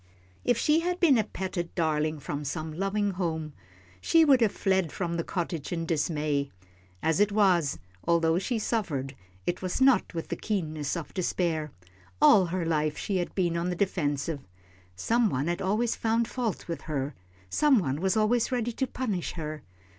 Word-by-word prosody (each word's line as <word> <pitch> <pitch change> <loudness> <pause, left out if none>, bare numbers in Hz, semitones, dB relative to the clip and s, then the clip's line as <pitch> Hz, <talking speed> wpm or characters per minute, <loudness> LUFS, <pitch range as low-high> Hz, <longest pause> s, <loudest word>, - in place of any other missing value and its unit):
If 245 -2 +2
she 300 +6 +3
had 355 +1 -1
been 285 -9 +5
a - - +3
petted 185 -4 -4
darling 155 -2 +1
from 145 +1 -4
some 155 +2 -4
loving 195 +4 0
home, 160 -5 -3 0.5
she 330 -1 +5
would 270 -4 +5
have 220 -3 +4
fled 190 -6 +1
from 170 -2 -2
the 170 - -1
cottage 170 -4 -3
in 165 -2 -2
dismay. 150 -3 0 0.5
As 160 -1 +2
it 205 0 +4
was, 185 -8 +3 0.3
although 165 0 +3
she 235 +5 -1
suffered, 160 - -2 0.3
it 175 - -1
was 185 -1 -2
not 260 -9 +4
with 165 - -4
the - - -1
keenness 155 -7 -2
of 165 - -7
despair. 165 -4 -1 0.5
All 190 -4 +6
her 175 0 -2
life 155 -2 0
she 195 - -1
had 175 - -3
been 175 -3 +1
on 170 +1 -1
the 180 - -1
defensive. 160 -5 -1 0.6
Some 230 - +2
one 130 -2 -1
had 175 +1 -1
always 215 +5 +1
found 225 +1 +1
fault 235 -5 -3
with 170 - -4
her, 140 -1 -2 0.4
some 295 -4 +4
one 145 -6 -1
was 190 +3 +1
always 225 +3 +2
ready 240 -2 0
to 265 +3 -2
punish 215 -9 -3
her. 155 -2 -5
175 Hz, 175 wpm, -28 LUFS, 155-215 Hz, 0.6 s, All